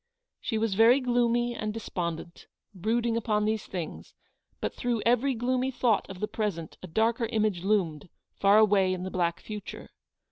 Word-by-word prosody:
She 225 Hz, -, -2 dB
was 220 Hz, -2 st, 0 dB
very 230 Hz, +6 st, +6 dB
gloomy 240 Hz, -1 st, +1 dB
and 215 Hz, -2 st, -3 dB
despondent, 170 Hz, -6 st, -5 dB, 0.3 s
brooding 230 Hz, +5 st, 0 dB
upon 210 Hz, -2 st, 0 dB
these 215 Hz, 0 st, -1 dB
things, 175 Hz, -4 st, -6 dB, 0.4 s
but -, -, -3 dB
through 240 Hz, -4 st, -1 dB
every 245 Hz, +3 st, +3 dB
gloomy 255 Hz, +2 st, 0 dB
thought 240 Hz, -4 st, +1 dB
of 190 Hz, -1 st, -8 dB
the 210 Hz, -, -1 dB
present 195 Hz, -9 st, -3 dB
a 185 Hz, -, -8 dB
darker 225 Hz, +6 st, +1 dB
image 215 Hz, -6 st, 0 dB
loomed, 180 Hz, -7 st, 0 dB, 0.2 s
far 200 Hz, +1 st, +4 dB
away 200 Hz, -3 st, +4 dB
in 180 Hz, -, -6 dB
the 190 Hz, -, -5 dB
black 175 Hz, -1 st, 0 dB
future. 210 Hz, -1 st, -8 dB
215 Hz, 165 wpm, -28 LUFS, 190-235 Hz, 0.4 s, very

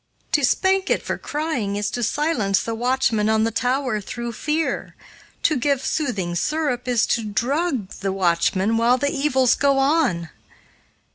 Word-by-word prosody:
To 295 Hz, -, +2 dB
spank 380 Hz, +9 st, +2 dB
it -, -, +1 dB
for -, -, -3 dB
crying 290 Hz, -10 st, -2 dB
is 205 Hz, 0 st, -2 dB
to 245 Hz, -, -3 dB
silence 230 Hz, -, 0 dB
the 230 Hz, -, -3 dB
watchman 235 Hz, -2 st, +1 dB
on 220 Hz, 0 st, +3 dB
the 225 Hz, -, 0 dB
tower 250 Hz, -1 st, 0 dB
through 235 Hz, +4 st, -5 dB
fear, 310 Hz, +6 st, -2 dB, 0.5 s
to 310 Hz, -, +3 dB
give 275 Hz, +1 st, 0 dB
soothing 205 Hz, -, -1 dB
syrup 270 Hz, -, -1 dB
is 240 Hz, -3 st, +2 dB
to 230 Hz, -, 0 dB
drug 250 Hz, -, -1 dB
the 195 Hz, -1 st, -2 dB
watchman 190 Hz, +3 st, +1 dB
while 235 Hz, +2 st, +3 dB
the 285 Hz, +2 st, 0 dB
evils 265 Hz, -3 st, +2 dB
go 280 Hz, -1 st, +2 dB
on. 270 Hz, -, +1 dB
245 Hz, 155 wpm, -22 LUFS, 215-285 Hz, 0.5 s, on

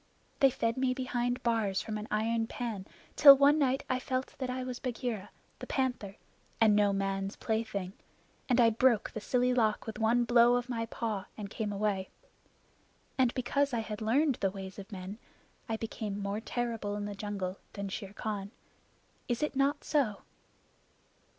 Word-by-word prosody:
They 270 Hz, -, +7 dB
fed 230 Hz, -2 st, -1 dB
me 255 Hz, -1 st, +1 dB
behind 250 Hz, -1 st, -1 dB
bars 220 Hz, -5 st, +1 dB
from 215 Hz, -, -4 dB
an 210 Hz, -, -7 dB
iron 225 Hz, +1 st, 0 dB
pan 220 Hz, -6 st, -5 dB, 0.3 s
till 280 Hz, -2 st, +10 dB
one 285 Hz, +2 st, +5 dB
night 270 Hz, -2 st, +2 dB
I 255 Hz, -, 0 dB
felt 255 Hz, 0 st, -3 dB
that 260 Hz, -2 st, -2 dB
I 255 Hz, 0 st, -2 dB
was 255 Hz, -1 st, -5 dB
Bagheera 235 Hz, -5 st, -3 dB, 0.3 s
the -, -, -7 dB
Panther 250 Hz, -7 st, -1 dB, 0.4 s
and 220 Hz, -2 st, +5 dB
no 205 Hz, -1 st, +4 dB
man's 195 Hz, 0 st, -2 dB
plaything, 210 Hz, -4 st, -2 dB, 0.6 s
and 250 Hz, 0 st, +3 dB
I 230 Hz, -1 st, +6 dB
broke 235 Hz, -1 st, +3 dB
the 220 Hz, -, -6 dB
silly 250 Hz, +3 st, +2 dB
lock 220 Hz, -4 st, +1 dB
with 220 Hz, -, -6 dB
one 230 Hz, +2 st, +3 dB
blow 240 Hz, 0 st, +5 dB
of 245 Hz, 0 st, -2 dB
my 230 Hz, -2 st, -2 dB
paw 220 Hz, -4 st, -3 dB
and 205 Hz, -2 st, -6 dB
came 220 Hz, -3 st, -3 dB
away. 200 Hz, -2 st, -1 dB, 1.1 s
And 255 Hz, -3 st, +3 dB
because 275 Hz, +2 st, 0 dB
I 230 Hz, -, 0 dB
had 215 Hz, 0 st, -6 dB
learned 260 Hz, +5 st, +2 dB
the 195 Hz, -, +3 dB
ways 190 Hz, 0 st, -8 dB
of 200 Hz, +3 st, -10 dB
men, 195 Hz, +2 st, -7 dB, 0.5 s
I 225 Hz, -, 0 dB
became 215 Hz, -2 st, -4 dB
more 200 Hz, +1 st, -2 dB
terrible 230 Hz, -4 st, -3 dB
in 205 Hz, 0 st, -3 dB
the 205 Hz, -, -4 dB
jungle 200 Hz, -2 st, -4 dB
than 200 Hz, -1 st, -4 dB
Shere 195 Hz, +1 st, -6 dB
Khan. 205 Hz, -2 st, -4 dB, 0.8 s
Is 240 Hz, +3 st, -1 dB
it 300 Hz, -, -1 dB
not 280 Hz, +2 st, +1 dB
so?" 245 Hz, -10 st, 0 dB
225 Hz, 175 wpm, -31 LUFS, 205-250 Hz, 1.1 s, till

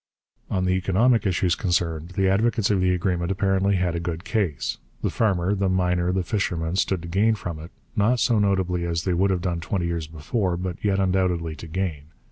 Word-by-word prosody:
On 95 Hz, 0 st, 0 dB
the 90 Hz, -, +2 dB
economic 100 Hz, +5 st, +2 dB
issues 90 Hz, -1 st, +1 dB
concerned 85 Hz, -3 st, -1 dB
the 95 Hz, -1 st, +3 dB
advocates 110 Hz, +2 st, +2 dB
of 95 Hz, -2 st, +2 dB
the 90 Hz, 0 st, +3 dB
agreement 90 Hz, -1 st, 0 dB
apparently 95 Hz, 0 st, +1 dB
had 90 Hz, -2 st, 0 dB
a 85 Hz, -, -2 dB
good 85 Hz, 0 st, -4 dB
case. 105 Hz, -, -1 dB, 0.2 s
The -, -, +1 dB
farmer, 95 Hz, -4 st, +1 dB
the 100 Hz, -1 st, 0 dB
miner, 90 Hz, -1 st, +1 dB
the 95 Hz, 0 st, 0 dB
fisherman 90 Hz, -3 st, -1 dB
stood 95 Hz, -3 st, 0 dB
to -, -, -6 dB
gain 105 Hz, +6 st, +2 dB
from 85 Hz, -6 st, -6 dB
it, 80 Hz, +2 st, -9 dB, 0.3 s
not 115 Hz, +4 st, +2 dB
so 115 Hz, -1 st, +3 dB
notably 95 Hz, -3 st, +1 dB
as 85 Hz, -1 st, -1 dB
they 95 Hz, -, 0 dB
would 95 Hz, +3 st, +2 dB
have 95 Hz, -2 st, 0 dB
done 85 Hz, -2 st, -1 dB
twenty 85 Hz, +1 st, -2 dB
years 85 Hz, -2 st, -2 dB
before, 85 Hz, +4 st, -2 dB
but 90 Hz, 0 st, -5 dB
yet 100 Hz, -2 st, +2 dB
undoubtedly 90 Hz, -4 st, 0 dB
to 85 Hz, -, -9 dB
gain. 80 Hz, -4 st, -3 dB
90 Hz, 205 wpm, -24 LUFS, 85-100 Hz, 0.3 s, the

